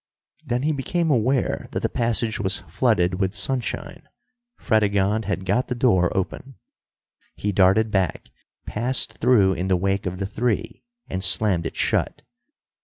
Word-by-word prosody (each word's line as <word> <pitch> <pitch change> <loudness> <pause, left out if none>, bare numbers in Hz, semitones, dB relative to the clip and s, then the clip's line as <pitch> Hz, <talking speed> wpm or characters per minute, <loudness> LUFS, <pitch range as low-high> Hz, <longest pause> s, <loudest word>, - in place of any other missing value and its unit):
Then 125 -3 -2
he 155 - +1
became 160 +4 -1
aware 130 +1 0
that - - -2
the - - +1
passage 115 -1 -1
was 95 -3 +1
flooded 90 0 0
with 95 0 -1
sunshine. 120 +4 -2 0.5
Fredegonde 105 0 +1
had 95 -2 -2
got 125 +5 +1
the 125 - -3
door 95 -8 +3
open. 125 +8 -4 0.8
He 105 - -2
darted 100 +3 +3
back, 95 -6 -1 0.3
passed 125 +4 -1
through 110 -6 +4
in 90 +1 -3
the 95 -1 +2
wake 95 +1 -1
of 90 0 -4
the 95 - -3
three, 110 +2 -2 0.3
and 95 0 -4
slammed 95 -3 +2
it - - -9
shut. - - -1
105 Hz, 150 wpm, -23 LUFS, 95-120 Hz, 0.8 s, through